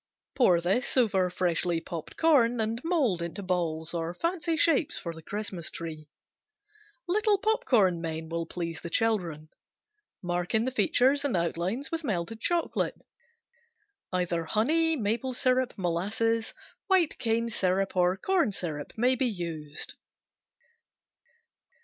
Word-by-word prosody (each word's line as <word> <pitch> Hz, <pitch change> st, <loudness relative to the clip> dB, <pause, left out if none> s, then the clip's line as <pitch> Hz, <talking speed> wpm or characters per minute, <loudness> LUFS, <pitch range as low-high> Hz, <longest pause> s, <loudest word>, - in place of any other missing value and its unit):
Pour 185 Hz, -10 st, +4 dB, 0.4 s
over 195 Hz, -8 st, +3 dB
freshly 175 Hz, -1 st, 0 dB
popped 165 Hz, -1 st, -7 dB
corn 250 Hz, -8 st, +4 dB
and 225 Hz, +2 st, -1 dB
mold 285 Hz, -, +1 dB
into 170 Hz, +4 st, -5 dB
balls 170 Hz, -3 st, -1 dB
or 170 Hz, 0 st, -3 dB
fancy 335 Hz, -, -1 dB
shapes 315 Hz, -1 st, +3 dB
for 170 Hz, -, -5 dB
the 160 Hz, -, -11 dB
Christmas 195 Hz, -2 st, -4 dB
tree. 155 Hz, -2 st, -7 dB, 1.0 s
Little 415 Hz, +3 st, +3 dB
popcorn 250 Hz, -, +2 dB
men 160 Hz, -1 st, -4 dB
will 165 Hz, 0 st, -3 dB
please 165 Hz, -2 st, -4 dB
the 170 Hz, -, -5 dB
children. 170 Hz, -7 st, 0 dB, 0.8 s
Mark 175 Hz, +2 st, -1 dB
in 220 Hz, +1 st, +3 dB
the 260 Hz, -, -1 dB
features 255 Hz, +5 st, +3 dB
and 260 Hz, -10 st, +1 dB
outlines 175 Hz, -, -2 dB
with 330 Hz, 0 st, -2 dB
melted 215 Hz, -, -2 dB
chocolate. 345 Hz, +3 st, 0 dB, 1.1 s
Either 175 Hz, -2 st, -1 dB
honey, 320 Hz, -, +2 dB
maple 235 Hz, +3 st, -1 dB
syrup, 255 Hz, -1 st, +1 dB
molasses, 205 Hz, +6 st, 0 dB, 0.3 s
white 375 Hz, -5 st, +3 dB
cane 230 Hz, 0 st, +1 dB
syrup 190 Hz, -3 st, 0 dB
or 180 Hz, +1 st, +3 dB
corn 345 Hz, -, +1 dB
syrup 155 Hz, -6 st, -4 dB
may 250 Hz, +3 st, +3 dB
be 255 Hz, 0 st, +1 dB
used. 165 Hz, -8 st, -5 dB
200 Hz, 125 wpm, -28 LUFS, 170-260 Hz, 1.1 s, Pour